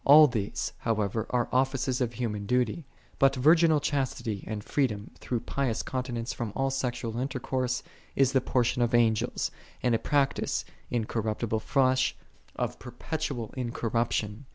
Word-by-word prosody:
All 150 Hz, +2 st, +9 dB
these, 110 Hz, -7 st, -2 dB
however, 110 Hz, -1 st, -1 dB
are 120 Hz, -1 st, +1 dB
offices 130 Hz, 0 st, +1 dB
of 120 Hz, -1 st, 0 dB
human 105 Hz, -4 st, -3 dB
duty: 125 Hz, +4 st, 0 dB, 0.3 s
but 135 Hz, 0 st, +5 dB
virginal 160 Hz, +3 st, +5 dB
chastity 130 Hz, -8 st, -2 dB
and 105 Hz, -1 st, -4 dB
freedom 110 Hz, -7 st, -1 dB
through 120 Hz, -3 st, -2 dB
pious 130 Hz, -5 st, -1 dB
continence 125 Hz, -2 st, -3 dB
from 115 Hz, -3 st, -4 dB
all 135 Hz, 0 st, +1 dB
sexual 120 Hz, -3 st, -2 dB
intercourse 130 Hz, -1 st, -1 dB, 0.3 s
is 135 Hz, -1 st, +4 dB
the 130 Hz, -1 st, +3 dB
portion 125 Hz, -1 st, +1 dB
of 120 Hz, 0 st, +2 dB
Angels, 115 Hz, -2 st, +2 dB, 0.3 s
and 125 Hz, -2 st, +3 dB
a 115 Hz, -, +3 dB
practice,6 140 Hz, -2 st, 0 dB, 0.2 s
in 120 Hz, -3 st, 0 dB
corruptible 110 Hz, 0 st, -1 dB
flesh, 130 Hz, +1 st, +2 dB, 0.4 s
of -, -, -3 dB
perpetual 125 Hz, -1 st, -4 dB
incorruption. 115 Hz, -1 st, -1 dB
125 Hz, 140 wpm, -28 LUFS, 115-135 Hz, 0.4 s, All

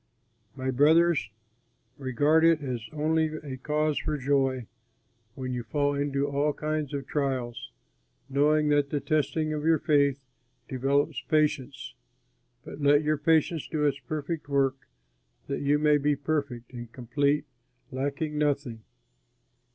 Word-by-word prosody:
My 130 Hz, -1 st, -2 dB
brothers, 155 Hz, -1 st, +4 dB, 0.7 s
regard 145 Hz, +4 st, +2 dB
it 165 Hz, -2 st, +4 dB
as 125 Hz, -4 st, -3 dB
only 160 Hz, +1 st, +1 dB
a 145 Hz, -4 st, -7 dB
cause 150 Hz, +2 st, 0 dB
for 155 Hz, -1 st, -2 dB
joy, 135 Hz, -2 st, +1 dB, 0.7 s
when 130 Hz, -1 st, -4 dB
you 125 Hz, -, -2 dB
fall 145 Hz, +5 st, 0 dB
into 140 Hz, 0 st, -1 dB
all 145 Hz, +1 st, 0 dB
kinds 155 Hz, -2 st, -3 dB
of 140 Hz, -2 st, -4 dB
trials. 130 Hz, -, -3 dB, 0.6 s
Know 150 Hz, +2 st, +2 dB
that 145 Hz, -1 st, +2 dB
the 145 Hz, -, -1 dB
testing 155 Hz, +1 st, 0 dB
of 150 Hz, -1 st, -3 dB
your 160 Hz, 0 st, +4 dB
faith 145 Hz, -3 st, +2 dB, 0.5 s
develops 140 Hz, +2 st, 0 dB
patience; 145 Hz, -3 st, -1 dB, 0.7 s
but 150 Hz, -, -9 dB
let 145 Hz, +1 st, +4 dB
your 150 Hz, -1 st, 0 dB
patience 160 Hz, 0 st, +2 dB
do 150 Hz, -2 st, -1 dB
its 140 Hz, -1 st, +1 dB
perfect 150 Hz, +3 st, -5 dB
work, 135 Hz, -2 st, 0 dB, 0.6 s
that 140 Hz, -, -3 dB
you 145 Hz, +1 st, +3 dB
may 150 Hz, 0 st, +3 dB
be 145 Hz, +1 st, +2 dB
perfect 140 Hz, -4 st, -3 dB
and 120 Hz, -1 st, -8 dB
complete, 140 Hz, +5 st, 0 dB, 0.5 s
lacking 145 Hz, +3 st, -2 dB
nothing. 140 Hz, -6 st, -1 dB
145 Hz, 135 wpm, -27 LUFS, 135-150 Hz, 0.7 s, brothers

